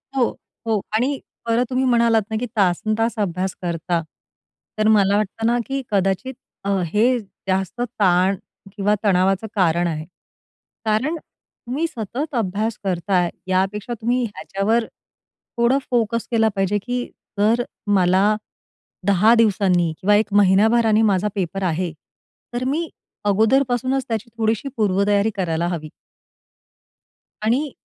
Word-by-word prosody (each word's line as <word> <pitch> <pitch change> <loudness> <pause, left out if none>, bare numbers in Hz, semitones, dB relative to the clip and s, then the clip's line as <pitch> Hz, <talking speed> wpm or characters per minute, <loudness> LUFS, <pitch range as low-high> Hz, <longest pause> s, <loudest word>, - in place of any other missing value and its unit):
हो, 250 -3 +3 0.4
हो. 220 -2 +2 0.2
आणि 265 +4 +1 0.3
परत 230 +2 +2
तुम्ही 260 +1 0
म्हणालात 235 -2 +4
ना, 220 - -3
की 245 - -2
तासंतास 215 +5 +1
अभ्यास 185 -1 -1
करता, 170 0 -1 0.8
तर 215 0 +2
मला 205 -2 +4
वाटतं 215 +2 -2
ना, 240 +1 +3
की 270 0 -2
कदाचित 195 +6 0 0.3
अ, 200 - -2 0.2
हे 235 +8 +2
जास्त 190 +2 -4
ताण 195 -5 +2 0.4
किंवा 205 0 +1
तणावाचं 195 +1 +2
कारण 175 -2 +2
आहे. 155 -1 -3 0.8
कारण 235 +10 +1
तुम्ही 285 0 -6
सतत 255 +5 -5
अभ्यास 215 +1 -1
करताय, 180 -1 +1 0.2
यापेक्षा 195 +5 0
तुम्ही 245 +2 +1
ह्याच्यावर 205 +4 -1 0.7
थोडं 240 +3 +3
फोकस 230 -1 0
केला 225 -1 +3
पाहिजे, 195 +1 +1
की 245 0 -2 0.3
जर 230 +4 +3 0.3
मला 190 +3 +4 0.7
10 205 +4 +5
दिवसांनी 190 -6 +3
किंवा 205 +2 +4
1 210 -1 +1
महिन्याभराने 215 +3 +4
माझा 190 +2 +1
पेपर 195 0 -2
आहे, 175 0 -1 0.6
तर 240 +1 -2
मी 320 +4 -1 0.4
अगोदरपासूनच 250 +5 +2
त्याची 225 0 -3
थोडीशी 225 +4 0
पूर्वतयारी 200 +1 +2
करायला 170 -3 -1
हवी. 160 -3 -4 1.5
आणि 260 +6 +1
210 Hz, 125 wpm, -21 LUFS, 190-235 Hz, 1.5 s, 10